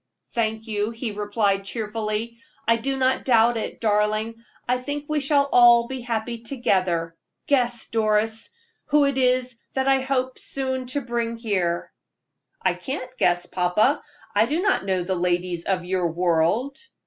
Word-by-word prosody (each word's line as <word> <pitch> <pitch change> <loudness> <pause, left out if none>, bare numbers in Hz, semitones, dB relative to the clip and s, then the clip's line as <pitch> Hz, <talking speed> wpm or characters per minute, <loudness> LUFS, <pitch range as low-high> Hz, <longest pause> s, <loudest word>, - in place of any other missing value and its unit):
"Thank 220 -1 -1
you," 210 -1 -1
he 230 0 -4
replied, 205 -1 0
cheerfully; 220 +2 -3 0.3
"I 230 0 +4
do 270 +4 -2
not 260 0 +1
doubt 235 -1 +4
it, 225 - -4
darling. 215 +1 0 0.2
I 250 +1 +1
think 290 +3 -4
we 305 -1 0
shall 280 0 +2
all 235 -1 +7
be 260 0 -5
happy 235 0 -3
together. 185 -9 0 0.3
Guess, 245 -4 +1
Doris, 220 0 +1 0.4
who 295 -1 +4
it 280 -1 0
is 250 -1 +1
that 265 0 0
I 270 -1 +4
hope 260 -1 -1
soon 260 -1 -3
to 280 +3 -1
bring 235 -1 -2
here." 185 -7 -1 0.7
"I - - +1
can't 255 -2 -6
guess, 175 0 +2
papa. 180 +10 +1 0.3
I - - +3
do 315 - 0
not 390 - +2
know 185 -2 0
the 190 +2 -1
ladies 175 -1 -1
of 185 -2 -1
your 180 -1 0
world." 175 +10 +1
230 Hz, 155 wpm, -24 LUFS, 200-255 Hz, 0.7 s, all